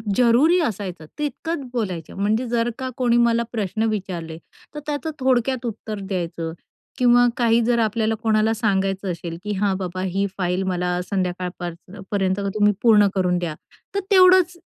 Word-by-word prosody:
जरुरी 255 - +4
असायचं 190 - -4
तितकंच 300 +2 -3
बोलायचं. 185 -9 -3
म्हणजे 215 +5 +1
जर 235 0 +1
का 260 - -3
कोणी 240 -2 +2
मला 235 0 +3
प्रश्न 215 -1 -2
विचारले 175 -6 -4 0.4
तर 295 - -3
त्याचं 300 +2 -3
थोडक्यात 255 -1 +1
उत्तर 220 -2 -5
द्यायचं 170 -4 -4 0.4
किंवा 245 -1 +5
काही 230 -1 +3
जर 235 0 +2
आपल्याला 220 0 +1
कोणाला 220 0 +2
सांगायचं 195 -3 0
असेल, 170 0 -6
की 210 - -3
"हां, 200 -2 +2
बाबा, 185 -1 -4
ही 190 +1 0
फाईल 180 0 0
मला 180 -1 -1
संध्याकाळपर्यं 180 0 -4
पर्यंत 195 -1 0 0.2
तुम्ही 210 0 +4
पूर्ण 215 -3 +6
करून 180 -2 +1
द्या." 170 -3 -3 0.4
तर 400 - +2
तेवढंच 370 -2 +6
210 Hz, 150 wpm, -22 LUFS, 185-240 Hz, 0.4 s, पूर्ण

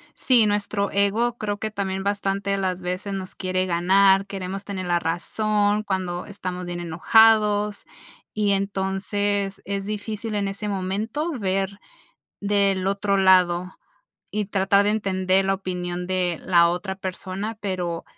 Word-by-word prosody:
Sí, 245 -4 +4
nuestro 205 -1 0
ego 215 +5 +1
creo 205 -2 -3
que 215 0 -3
también 195 -2 -3
bastante 200 0 -1
de 200 - +1
las 185 -1 -2
veces 185 +3 -3
nos 190 -1 -5
quiere 185 0 -1
ganar, 190 +2 +4
queremos 195 0 -5
tener 190 -2 -4
la 175 -1 +1
razón 205 +5 0
cuando 185 -3 -3
estamos 185 -3 -5
bien 175 0 -5
enojados 210 +5 +3 0.5
y 210 -1 +1
entonces 195 0 -1
es 195 0 -3
difícil 215 +1 -4
en 200 -1 0
ese 200 +2 -4
momento 205 - -2
ver 195 -1 -1 0.6
del 200 -2 +1
otro 200 0 +1
lado 185 -1 +3 0.6
y 210 -1 -2
tratar 200 0 +2
de 205 - +2
entender 190 -2 +1
la 195 0 +2
opinión 180 -2 -4
de 180 -3 -1
la 170 -2 +5
otra 180 +3 -3
persona, 190 +3 -5
pero 180 -4 -3
195 Hz, 140 wpm, -23 LUFS, 185-205 Hz, 0.6 s, la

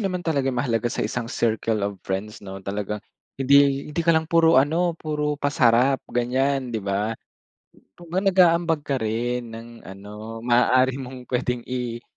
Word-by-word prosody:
naman 185 -3 -2
talaga 140 -5 0
yung 125 - -2
mahalaga 120 -2 0
sa - - -2
isang 120 -2 -3
circle 110 -2 0
of 100 -1 -4
friends 100 +3 -4
'no, 95 -1 -8
talagang 105 +1 -4 0.3
hindi 140 +1 +4
hindi 170 - -1
ka 165 0 +4
lang 160 - +1
puro 165 -1 +4
ano, 165 +5 +2
puro 150 -2 -2
pasarap, 135 -2 +3
ganyan, 130 +1 0
'di 110 - -2
ba? 100 +3 -1 0.8
Kumbaga 175 +3 -4
nag-aambag 170 -4 +3
ka 140 -1 -1
rin 115 +1 -2
ng 115 +1 -9 0.2
ano 105 +3 -9
maaari 125 +2 +3
mong 125 -1 -9
pwedeng 125 -1 -1
i 120 -2 -4
125 Hz, 160 wpm, -23 LUFS, 115-145 Hz, 0.8 s, hindi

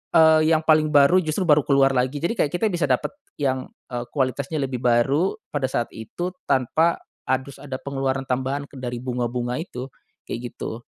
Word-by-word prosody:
eee, 160 -1 +7
yang 155 - +1
paling 155 -1 +5
baru 145 +6 +6
justru 155 +4 -1
baru 150 -1 +6
keluar 135 -1 +4
lagi 130 +2 +1
jadi 170 - +1
kayak 145 - +1
kita 200 - 0
bisa 170 -4 0
dapat 125 -1 +1 0.3
yang, 130 -2 0 0.2
eee, 120 0 -3
kualitasnya 135 +2 -1
lebih 130 -2 -3
baru 135 +9 +3 0.2
pada 140 -3 0
saat 120 -2 -1
itu 175 +11 -5 0.2
tanpa 140 +6 +2 0.3
harus 130 +1 -1
ada 135 -2 -5
pengeluaran 135 -1 -2
tambahan 130 +2 -1
ke - - -16
dari 125 -1 -4
bunga-bunga 125 0 -2
itu, 130 -6 -6 0.4
kayak 120 0 -5
gitu. 110 - -5
135 Hz, 175 wpm, -23 LUFS, 125-155 Hz, 0.4 s, eee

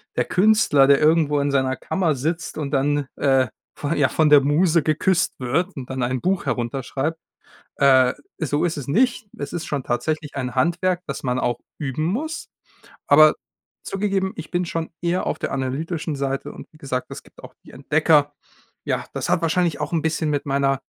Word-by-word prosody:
der - - +1
Künstler, 195 -8 +4
der 140 0 +5
irgendwo 150 -2 +3
in 140 0 0
seiner 130 -1 +1
Kammer 170 -1 -1
sitzt 155 +4 -3
und 145 - -3
dann, 145 0 0
äh, 135 -2 +2 0.3
von 145 - -2
ja, 140 -2 +3
von 155 -2 +2
der 145 -1 +8
Muse 160 +3 +2
geküsst 165 +4 +1
wird 165 +10 -1
und 135 -3 -7
dann 130 -1 -2
ein 125 0 -1
Buch 185 -3 0
herunterschreibt. 135 +5 -2 0.6
Äh, 130 -2 +5 0.3
so 150 +1 0
ist 165 -2 -2
es 140 - -6
nicht. 240 - +1
Es 145 - -6
ist 170 -2 -4
schon 140 -3 -2
tatsächlich 150 +4 -2
ein 125 -2 -4
Handwerk, 175 +5 +1
das 140 - -5
man 125 -1 -1
auch 120 -2 -1 0.2
üben 145 0 -3
muss. 305 - -3 0.6
Aber 155 +1 +7 0.5
zugegeben, 195 -1 -1
ich 160 - -7
bin 175 +1 0
schon 165 -1 -3
eher 175 +1 0
auf - - -2
der - - -3
analytischen 150 +4 -3
Seite 135 0 -3
und - - -11
wie 155 - -19
gesagt, 130 -3 -4
es - - -8
gibt - - -19
auch - - -11
die - - -14
Entdecker. 150 +1 +2 0.5
Ja, - - -1
das - - -3
hat - - +2
wahrscheinlich 165 -1 0
auch 150 - -3
'n 165 -3 0
bisschen 160 -1 -1
mit 145 0 -1
meiner, 135 -1 +1
150 Hz, 190 wpm, -22 LUFS, 135-170 Hz, 0.6 s, der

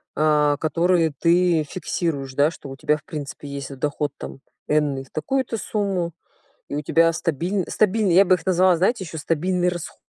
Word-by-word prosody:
э. 150 -1 +3
Которые 165 +1 +2
ты 170 -1 +3
фиксируешь, 150 -6 -3
да, 145 +3 +3
что 140 - -11
у 135 - -7
тебя 150 +2 +1
в 150 - -18
принципе 145 -1 -7
есть 140 -1 -6
доход, 145 +1 -2
там - - -8 0.3
энный 145 -3 +1
в 135 - -20
такую-то 235 - -2
сумму, 190 -5 -2 0.5
и - - -5
у 150 - -1
тебя 165 +3 +3
стабиль 170 +5 -1
стабильный, 210 -3 +2
я 195 - +7
бы 185 - +5
их 170 -1 -10
назвала, 185 0 +4
знаете, 190 +3 +1
ещё 160 0 -8
стабильный 175 +3 0
расход. 175 -2 -7
165 Hz, 180 wpm, -23 LUFS, 150-185 Hz, 0.5 s, я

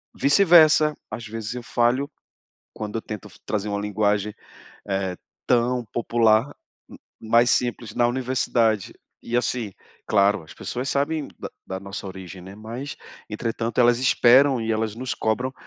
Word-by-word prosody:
vice-versa, 155 -2 +5 0.2
às 115 +1 -6
vezes 110 +1 -5
eu 125 - -6
falho 120 +4 +1 0.7
quando 105 0 -5
eu 115 - -3
tento 105 -3 -7
f - - -17
trazer 105 -1 -2
uma 100 0 -2
linguagem, 105 0 0 0.6
eh, 95 -2 -1 0.3
tão 125 0 +2
popular, 115 -1 +3 0.4
m - - -12 0.2
mas 115 +2 +4
simples 120 -2 -1
na 120 - +3
universidade. 120 -4 0 0.3
E 120 - -1
assim, 120 -3 -1 0.4
claro, 100 -1 +3
as 80 0 -13
pessoas 125 - -4
sabem 145 +2 -1
da - - -6 0.2
da 95 - -4
nossa 100 0 -7
origem, 95 -1 -9
né, 95 +2 -11
mas, 115 +7 -7 0.3
entretanto, 115 +2 -3
elas 120 -1 +4
esperam 130 +1 +5
e 115 0 -1
elas 110 -1 -1
nos 130 +2 -3
cobram 125 +4 -1
115 Hz, 150 wpm, -23 LUFS, 105-125 Hz, 0.7 s, vice-versa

